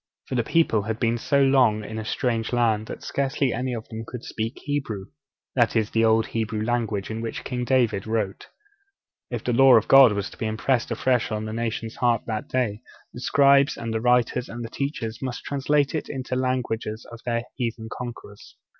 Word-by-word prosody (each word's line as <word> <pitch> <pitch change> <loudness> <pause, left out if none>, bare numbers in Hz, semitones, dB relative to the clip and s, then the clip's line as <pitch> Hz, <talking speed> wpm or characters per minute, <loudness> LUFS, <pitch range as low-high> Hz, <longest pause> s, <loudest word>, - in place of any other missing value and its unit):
For - - -7
the 120 -2 +1
people 155 -7 +2
had 110 +2 -4
been 115 0 +1
so 140 +3 +2
long 125 -6 +4
in 110 +2 -6
a - - -4
strange 115 -1 -1
land 110 -3 +1
that - - -8
scarcely 135 -1 0
any 130 +1 -2
of 115 - -7
them 110 0 -6
could 120 +1 -8
speak 115 +3 -4
Hebrew; 135 -10 -3 0.5
that 120 -3 +2
is, 110 -2 +1
the 115 - +2
old 110 0 +4
Hebrew 110 -1 -2
language 110 -4 -1
in 110 +1 -4
which 115 -1 -5
King 125 -2 -3
David 120 -6 +1
wrote. 110 -3 -2 0.8
If - - -4
the 125 - 0
Law 135 +1 +7
of 110 - +3
God 135 -5 +8
was 100 -1 -3
to - - -14
be 110 - -1
impressed 120 +3 0
afresh 120 0 +1
on 110 0 -2
the 110 - -5
nation's 115 0 -3
heart 120 -2 +2
that 110 -2 -3
day, 120 -4 -1 0.3
the 125 - -8
scribes, 140 +1 +4
the 110 -1 -3
writers 125 +1 +2
and 120 +1 -6
the 115 - -9
teachers 125 -6 -4
must 130 -2 -4
translate 145 0 +1
it 155 - -3
into 130 -2 -4
the 130 - +1
language 125 -3 -1
of 115 +2 -7
their 115 -1 -1
heathen 115 -2 -3
conquerors. 120 -4 -9
115 Hz, 200 wpm, -24 LUFS, 110-130 Hz, 0.8 s, God